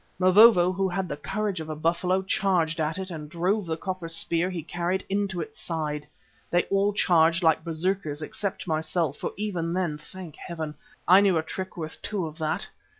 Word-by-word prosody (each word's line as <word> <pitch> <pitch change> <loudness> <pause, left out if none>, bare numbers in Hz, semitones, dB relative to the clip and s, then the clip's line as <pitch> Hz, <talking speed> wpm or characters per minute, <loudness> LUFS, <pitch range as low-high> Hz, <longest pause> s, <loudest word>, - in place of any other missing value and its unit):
Mavovo, 185 0 +7
who 190 +1 0
had 185 +1 -2
the - - -4
courage 195 +5 -2
of 160 0 -6
a 155 - -3
buffalo, 175 +4 +1
charged 180 -4 +1
at 155 +2 -1
it 190 -1 -5
and 150 -3 -7
drove 180 +5 0
the 160 -1 -2
copper 185 -2 -4
spear 165 +2 +2
he 175 -4 -4
carried 175 +4 -2
into 195 -3 -1
its 155 - -7
side. 150 -3 -3 0.4
They 175 0 +3
all 195 +1 +3
charged 170 -3 +3
like 160 -1 +3
berserkers, 160 -2 -2
except 195 +4 -4
myself, 160 -1 -1
for - - -3
even 180 -5 -2
then, 175 -5 -1
thank 170 0 -11
Heaven! 160 -3 -5 0.3
I 185 +3 +8
knew 195 -4 +4
a 160 - 0
trick 185 +4 -6
worth 160 -2 -6
two 200 -5 -2
of 155 +1 -8
that. 155 -1 -1
175 Hz, 190 wpm, -26 LUFS, 160-190 Hz, 0.4 s, I